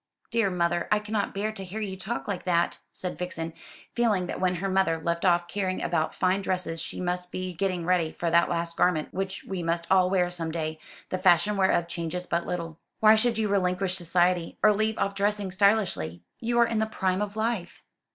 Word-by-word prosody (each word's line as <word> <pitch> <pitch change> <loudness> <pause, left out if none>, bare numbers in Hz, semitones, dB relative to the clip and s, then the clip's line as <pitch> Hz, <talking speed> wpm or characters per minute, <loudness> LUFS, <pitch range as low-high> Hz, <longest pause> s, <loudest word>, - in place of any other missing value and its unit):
"Dear 230 -4 +2
mother, 175 -1 0
I 210 - +5
cannot 210 -1 -2
bear 210 +2 -1
to 205 -3 -7
hear 190 +4 -6
you 200 -3 -3
talk 210 +5 -4
like 195 -4 -3
that," 170 -2 +1
said 180 -4 -6
Vixen, 165 -2 -4 0.4
feeling 215 -6 +2
that - - -5
when 180 -1 +1
her 190 +3 -2
mother 190 -4 +2
left 170 +1 -2
off 175 -1 +3
caring 185 0 -2
about 155 - -1
fine 185 +1 +1
dresses 180 -4 -2
she - - -4
must 180 0 -2
be 185 0 -4
getting 180 -1 -1
ready 175 -3 +2
for 170 -1 -2
that 170 +1 +4
last 170 -1 -1
garment 165 -4 +1
which 190 +1 -3
we 190 -2 -4
must 170 0 -1
all 185 -1 +5
wear 180 -2 +2
some 165 -2 -2
day, 160 -1 -3 0.3
the 185 - -2
fashion 185 +2 +4
whereof 190 -3 +2
changes 170 +1 -4
but 170 -1 -1
little. 165 -2 -4 0.2
"Why 215 0 +7
should 230 +1 +2
you 220 -1 +1
relinquish 185 -1 +1
society, 175 -1 +1
or 215 - +7
leave 215 +1 0
off 200 - 0
dressing 200 -1 0
stylishly? 190 - +1 0.2
You 235 0 -1
are 235 - +6
in 225 -1 -1
the 220 - +1
prime 190 -3 -1
of 205 0 -3
life." 220 -5 -2
185 Hz, 210 wpm, -27 LUFS, 170-200 Hz, 0.4 s, Why